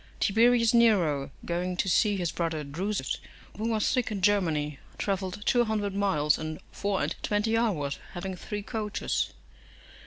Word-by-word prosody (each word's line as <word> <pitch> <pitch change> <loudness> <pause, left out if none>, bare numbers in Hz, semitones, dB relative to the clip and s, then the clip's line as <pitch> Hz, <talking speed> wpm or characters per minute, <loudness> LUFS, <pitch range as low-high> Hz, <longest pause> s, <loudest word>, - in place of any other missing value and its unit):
Tiberius 230 +2 +4
Nero, 185 -12 +4 0.2
going 180 +1 -2
to 190 - 0
see 205 +3 +3
his 175 -4 -1
brother 165 -3 -2
Drusus, 185 +9 -2 0.4
who 220 +2 -2
was 220 -2 +1
sick 250 -3 +1
in 200 -3 -3
Germany, 160 -8 +2 0.2
travelled 195 0 -2
two 240 -1 +4
hundred 210 -3 -1
miles 155 -7 +2
in 155 0 -4
four 200 -1 -1
and - - -1
twenty 210 +2 +1
hours, 170 -12 0
having 190 +1 -4
three 205 +3 -5
coaches. 215 -1 -2
200 Hz, 150 wpm, -28 LUFS, 170-215 Hz, 0.4 s, Tiberius